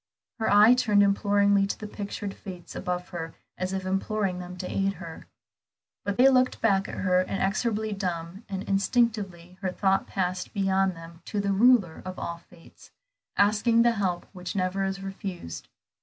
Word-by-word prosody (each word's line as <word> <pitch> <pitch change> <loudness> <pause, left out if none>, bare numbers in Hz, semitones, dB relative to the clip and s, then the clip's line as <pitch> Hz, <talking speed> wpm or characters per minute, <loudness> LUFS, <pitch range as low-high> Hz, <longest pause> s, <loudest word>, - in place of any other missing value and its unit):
Her 220 - +1
eye 210 +4 +8
turned 215 -5 +4
imploringly 200 0 +3
to - - -3
the 215 - -6
pictured 205 -1 -5
Fates 185 -4 -10
above 180 0 -3
her 165 -2 -6 0.2
as 185 0 -3
if 190 -1 -3
imploring 195 0 -1
them 180 0 -8
to 180 - -5
aid 195 0 0
her. 165 -3 -10 0.8
But 200 -1 -2
they 255 - +7
looked 255 -1 +3
back 195 -3 +2
at - - -6
her 185 -1 +2
inexorably 210 +3 -1
dumb, 180 0 -4
and 195 -1 -3
instinctively 195 -4 0
her 190 - 0
thought 195 +1 +1
passed 185 -1 -2
beyond 195 -1 +2
them 165 +1 -12
to 210 - -3
the 200 0 +1
Ruler 210 -5 +4
of 185 0 -7
all 170 0 -4
fates, 170 0 -18 0.5
asking 220 +3 +4
the 235 - +5
help 190 -6 -1
which 180 0 -6
never 190 0 0
is 195 0 -3
refused. 195 - -6
195 Hz, 170 wpm, -27 LUFS, 180-205 Hz, 0.8 s, eye